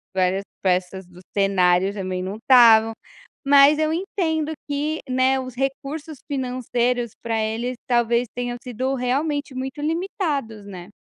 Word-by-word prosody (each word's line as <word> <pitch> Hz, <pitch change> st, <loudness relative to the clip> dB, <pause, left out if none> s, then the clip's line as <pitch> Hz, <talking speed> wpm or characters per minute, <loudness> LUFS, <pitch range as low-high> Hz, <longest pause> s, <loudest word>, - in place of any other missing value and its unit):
várias 185 Hz, +1 st, +1 dB, 0.2 s
peças 185 Hz, 0 st, -1 dB
do 180 Hz, 0 st, -16 dB
cenário 190 Hz, -1 st, +3 dB
também 185 Hz, -2 st, -4 dB
não 190 Hz, +2 st, -4 dB
estavam. 225 Hz, -2 st, +6 dB, 0.5 s
Mas 285 Hz, +2 st, +6 dB
eu 310 Hz, 0 st, +1 dB
entendo 320 Hz, -4 st, -1 dB, 0.2 s
que, 295 Hz, +2 st, -2 dB
né, 260 Hz, +1 st, +2 dB
os 255 Hz, -2 st, -7 dB
recursos 275 Hz, +3 st, -4 dB
financeiros, 250 Hz, -3 st, -1 dB
para 225 Hz, -1 st, -1 dB
eles, 230 Hz, +3 st, -2 dB
talvez 240 Hz, 0 st, +2 dB
tenham 245 Hz, 0 st, -3 dB
sido 255 Hz, +2 st, -2 dB
realmente 280 Hz, +2 st, -1 dB
muito 265 Hz, +3 st, -5 dB
limitados, 305 Hz, -, -2 dB
né. 185 Hz, -2 st, -10 dB
250 Hz, 130 wpm, -22 LUFS, 210-285 Hz, 0.5 s, estavam